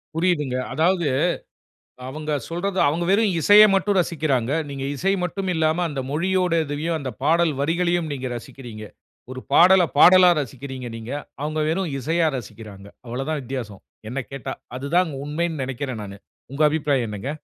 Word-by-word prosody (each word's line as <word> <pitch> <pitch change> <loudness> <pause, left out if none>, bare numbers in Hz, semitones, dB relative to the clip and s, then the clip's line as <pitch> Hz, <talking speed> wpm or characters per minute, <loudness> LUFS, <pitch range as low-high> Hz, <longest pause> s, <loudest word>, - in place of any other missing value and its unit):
புரியுதுங்க. 155 -7 0 0.2
அதாவது 170 +2 +2 1.0
அவுங்க 155 +3 -5 0.2
சொல்றத 185 +3 -3
அவுங்க 165 +4 0
வெறும் 200 -1 +3
இசைய 210 +4 +8
மட்டும் 195 +1 +1
ரசிக்கிறாங்க. 140 -7 -1 0.2
நீங்க 135 -1 -5
இசை 195 +7 +1
மட்டும் 190 +1 -3
இல்லாம, 160 0 +1
அந்த 135 -2 -3
மொழியோட 180 +2 +1
இதையும் 155 +3 -2
அந்த 135 -2 -4
பாடல் 165 0 +3
வரிகளையும் 170 +2 0
நீங்க 130 -1 -4
ரசிக்கிறீங்க. 115 -3 -10 0.5
ஒரு 130 - -6
பாடல 185 +2 +7
பாடலா 180 +3 +8
ரசிக்கிறீங்க 130 -1 -7
நீங்க. 115 +3 -7 0.3
அவுங்க 155 +1 -2
வெறும் 170 -1 -1
இசையா 160 +4 +1
ரசிக்கிறாங்க. 105 -4 -10 0.2
அவளதான் 135 +6 -3
வித்தியாசம், 120 -6 -6 0.3
என்ன 135 +3 -3
கேட்டா. 135 -1 -5 0.2
அதுதான் 160 +5 +1
உண்மைன்னு 155 0 -2
நினைக்கிறேன் 130 -3 -4
நானு. 100 0 -9 0.3
உங்க 140 +3 -4
அபிப்பிராயம் 145 -5 0
என்னங்க? 105 +6 -5
150 Hz, 140 wpm, -22 LUFS, 130-175 Hz, 1.0 s, இசைய